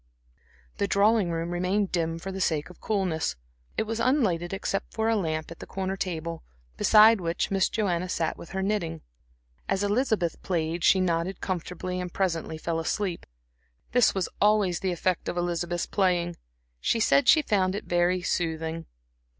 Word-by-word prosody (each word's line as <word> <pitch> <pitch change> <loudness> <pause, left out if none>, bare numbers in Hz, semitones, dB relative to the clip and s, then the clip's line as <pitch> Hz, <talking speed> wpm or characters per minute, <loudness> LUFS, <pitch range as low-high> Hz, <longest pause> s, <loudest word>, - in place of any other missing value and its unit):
The 200 - 0
drawing 200 0 +3
room 165 +1 -2
remained 185 +3 0
dim 165 -2 -1
for 190 +4 -6
the 190 0 -5
sake 160 -1 0
of 180 - -18
coolness; 185 - -1 0.4
it - - +2
was 225 +1 -4
unlighted 220 - +1
except 195 0 -3
for 220 0 +1
a 225 - +3
lamp 160 -5 -2
at 170 - -10
a - - -8
corner 190 0 -3
table, 170 -3 -4 0.3
beside 215 - +6
which 170 +2 -1
Miss 195 -1 +2
Joanna 185 -5 -1
sat 165 -3 -1
with 170 - -11
her 190 +1 -3
knitting. 175 -6 -1 0.7
As 195 +1 +1
Elizabeth 205 -5 0
played 165 -1 -2
she 190 - +5
nodded 175 +1 0
comfortably 180 0 -3
and 180 -1 -5
presently 165 -4 -1
fell 165 +1 -2
asleep. 180 +2 -2 0.6
This 245 -4 +4
was 190 -2 0
always 205 -4 +3
the 190 - -1
effect 180 0 -1
of - - -4
Elizabeth's 175 0 -1
playing; 175 -3 +1 0.4
she 230 - +1
said 250 +4 +3
she 310 +3 +6
found 190 -6 +1
it 205 - -5
very 175 +1 +1
soothing. 165 -1 -2
180 Hz, 165 wpm, -27 LUFS, 170-200 Hz, 0.7 s, beside